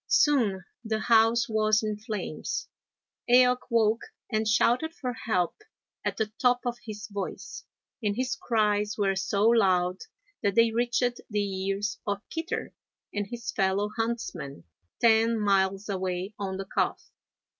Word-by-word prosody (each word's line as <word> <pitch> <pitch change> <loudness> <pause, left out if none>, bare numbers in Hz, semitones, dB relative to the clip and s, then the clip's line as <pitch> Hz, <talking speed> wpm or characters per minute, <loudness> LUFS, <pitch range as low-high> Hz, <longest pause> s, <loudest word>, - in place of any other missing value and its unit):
Soon 220 -11 +3 0.2
the 220 -1 -1
house 225 +2 +4
was 215 0 +2
in 215 -1 -1
flames. 210 -7 -4 0.6
Eaoch 250 0 +6
woke 225 -1 +3 0.3
and 220 -1 0
shouted 245 +9 +2
for 250 -6 -3
help 185 -7 0 0.5
at - - -2
the 220 - +1 0.2
top 245 -1 +4
of 240 -1 -2
his 210 -3 -7
voice, 200 -2 -6 0.4
and 205 -2 0
his 255 0 -1
cries 210 -2 0
were 195 -2 +1
so 200 +2 0
loud 185 -5 +3 0.4
that 200 -2 0
they 230 0 +5
reached 240 +1 0
the 200 -3 -2
ears 205 +2 -2
of 205 0 -3
Kitter 325 +1 -4 0.4
and 205 -1 -2
his 235 +2 -5
fellow 195 +1 0
huntsmen, 225 - -3 0.4
ten 230 0 +4
miles 195 -1 +1
away 190 0 -3
on 190 -2 -3
the 195 - -5
Calf. - - -2
215 Hz, 140 wpm, -28 LUFS, 195-235 Hz, 0.6 s, Eaoch